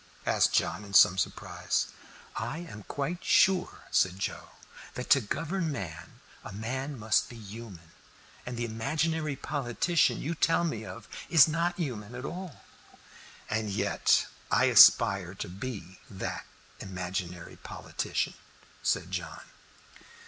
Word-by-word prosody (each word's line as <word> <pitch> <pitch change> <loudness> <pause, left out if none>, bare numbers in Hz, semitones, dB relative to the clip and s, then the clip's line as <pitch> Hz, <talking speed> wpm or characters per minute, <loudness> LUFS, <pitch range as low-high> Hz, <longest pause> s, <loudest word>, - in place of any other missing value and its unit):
asked - - +3
John, 85 +5 +1
in 100 -1 -7
some 95 - +8
surprise. - - -1 0.5
"I 120 +7 -3
am 165 -12 -8
quite 155 +6 -3
sure," 190 -1 +3
said 90 0 +2
Joe, 95 - -4 0.5
"that 125 - -5
to 135 0 +7
govern 165 - -2
man 85 - -7 0.2
a - - -8
man 130 +7 -4
must 110 -1 +1
be 120 - -10
human, 105 -6 -10 0.5
and 125 -1 -6
the 120 - -1
imaginary 150 +7 -1
politician 145 +4 +1
you 160 - -2
tell 165 +1 +2
me 115 -10 -2
of 110 0 -9 0.2
is 165 -4 +8
not 170 +2 0
human 120 - -4
at 125 +2 -6
all." 180 -3 -7 0.8
"And 110 -1 -1
yet 100 - +2 0.2
I - - +4
aspire 95 -2 +7
to - - -5
be 95 -1 -7
that 95 - -5 0.3
imaginary 90 -2 -5
politician," - - -3 0.5
said - - 0
John. - - -5
120 Hz, 130 wpm, -29 LUFS, 100-155 Hz, 0.8 s, some